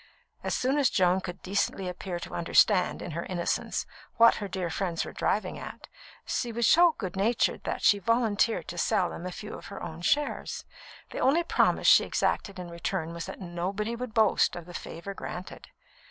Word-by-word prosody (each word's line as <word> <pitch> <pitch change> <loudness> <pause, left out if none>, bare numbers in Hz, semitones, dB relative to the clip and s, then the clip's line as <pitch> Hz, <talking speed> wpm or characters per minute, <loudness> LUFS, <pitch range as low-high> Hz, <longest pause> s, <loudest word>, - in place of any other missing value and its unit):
As - - -1
soon 270 +3 +1
as 275 - +4
Joan 185 0 +3
could 180 0 -7
decently 195 0 -1
appear 180 0 -4
to - - -8
understand, 180 +2 +3
in - - -5
her 170 +2 -3
innocence, 175 -2 -1 0.3
what 230 0 +7
her 205 - -4
dear 185 -3 -3
friends 175 -2 -2
were - - -8
driving - - -1
at, - - -9 0.4
she 240 - -2
was 235 +1 0
so 340 +6 +6
"good 185 -4 -5
natured" 215 +5 +1
that - - -3
she 205 - +5
volunteered 230 0 +1
to 175 - -5
sell 180 +1 +1
them 180 - -6
a - - -5
few 210 +4 -8
of - - -9
her 200 - -8
own 165 -1 -7
shares. 290 +11 0 0.5
The - - -5
only 310 +6 +3
promise - - +2
she - - +8
exacted 200 -2 -1
in 180 -1 -7
return 170 -2 -3
was 170 +1 -5
that 190 - -8
nobody 190 +6 -3
would 240 -1 -6
boast 220 -3 +3
of 175 -2 -7
the 175 - -11
favour 170 +3 -7
granted. 185 -1 -8
190 Hz, 195 wpm, -28 LUFS, 175-225 Hz, 0.5 s, she